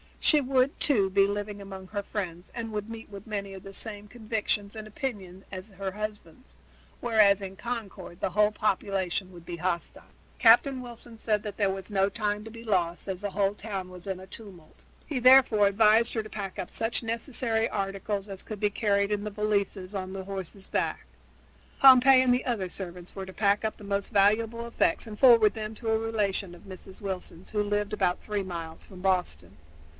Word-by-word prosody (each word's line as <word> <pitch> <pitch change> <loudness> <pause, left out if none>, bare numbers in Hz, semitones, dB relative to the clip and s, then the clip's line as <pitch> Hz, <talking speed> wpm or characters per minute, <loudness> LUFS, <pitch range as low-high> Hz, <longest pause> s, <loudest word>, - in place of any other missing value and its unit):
She 305 - +5
would, 265 0 +1
too, 210 -10 +3
be 195 +1 +4
living 205 0 -4
among 190 -1 -9
her 205 -1 -2
friends 180 -4 -5
and 225 -1 -4
would 210 0 -4
meet 225 -1 -8
with 200 +1 -10
many 200 -2 -4
of 190 - -10
the 195 - -10
same 210 0 -7
convictions 215 -2 -2
and 215 -1 -7
opinions 200 -6 -5
as 185 0 -7
her 195 -1 -5
husband's, 210 +1 -7 0.5
whereas 210 -4 +4
in 190 -1 -6
Concord 200 -6 -6
the - - -1
whole 210 +2 +4
population 195 -3 -1
would 170 -2 -13
be 170 0 -6
hostile. 175 0 -3 0.3
Captain 255 +3 +6
Wilson 240 -1 -11
said 215 -2 0
that 210 -2 -6
there 200 -2 +2
was 195 +1 -6
no 195 -1 +3
time 210 0 0
to - - -7
be 230 +1 -10
lost, 180 -6 0
as 190 -1 -4
the 205 -1 -3
whole 200 +1 +1
town 200 -3 -5
was 180 +1 -11
in 190 -1 -3
a 185 - -10
tumult. 190 -6 -12 0.3
He 285 -5 -2
therefore 250 -5 +7
advised 215 +3 +4
her 220 - -1
to 215 - -10
pack 200 -3 -6
up 180 - -4
such 225 +1 -1
necessary 230 -1 -1
articles 195 0 -3
as 195 -1 -7
could 215 -2 -7
be 210 0 +2
carried 200 -1 +1
in 205 -1 0
the 210 - -4
valises, 200 -2 -1
on 190 -1 -4
the 195 -1 -5
horses' 195 0 -7
backs. - - -1 0.7
Pompey 265 0 +8
and 255 -1 +4
the 250 - 0
other 210 -7 -1
servants 180 -1 -7
were 195 -1 -5
to 190 - -10
pack 205 +1 +2
up 220 - -2
the - - -13
most 200 +1 -2
valuable 225 +3 +2
effects 235 -7 +1
and 215 -2 -8
to - - -22
forward 230 -5 +7
them 220 -1 -5
to 225 +1 -4
a 220 - +3
relation 205 -5 -1
of - - -16
Mrs. 190 0 -11
Wilson's 190 -3 -5
who 210 - +1
lived 205 0 -1
about 180 -4 +1
three 210 -2 -2
miles 165 -3 -6
from 185 -2 -12
Boston. 180 - -1
205 Hz, 200 wpm, -28 LUFS, 190-220 Hz, 0.7 s, Pompey